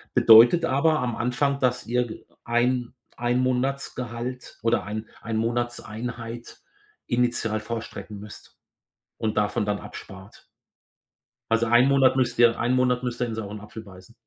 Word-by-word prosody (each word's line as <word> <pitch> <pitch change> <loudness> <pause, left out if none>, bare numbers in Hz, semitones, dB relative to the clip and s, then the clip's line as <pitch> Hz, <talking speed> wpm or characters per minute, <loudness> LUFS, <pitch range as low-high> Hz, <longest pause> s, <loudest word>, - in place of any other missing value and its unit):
Bedeutet 115 +9 +7
aber 155 +4 +2
am 120 -2 -2
Anfang, 140 +3 0
dass 125 -1 0
ihr 125 +1 0
g 110 - -10 0.2
1- 120 +1 0 0.2
1 120 +1 0
Monatsgehalt 125 -1 -3
oder 115 -2 +1
1- 110 +1 -6
1 115 -1 -4
Monatseinheit 115 0 -4 0.4
initial 120 -3 0
vorstrecken 110 -1 -7
müsst 105 0 -13 0.6
und 110 -2 -2
davon 105 +1 0
dann 105 0 -1
abspart. - - -12 1.1
Also, 115 0 +2
1 120 +3 +5
Monat 135 -2 +4
müsst 125 -3 0
ihr 120 -1 +5
1 120 +2 +1
Monat 125 -1 +1
müsst 125 0 -4
ihr 125 - +1
in 115 - -4
sauren 105 -1 -6
Apfel 110 +1 -10
beißen. 95 +1 -15
120 Hz, 145 wpm, -25 LUFS, 110-125 Hz, 1.1 s, Bedeutet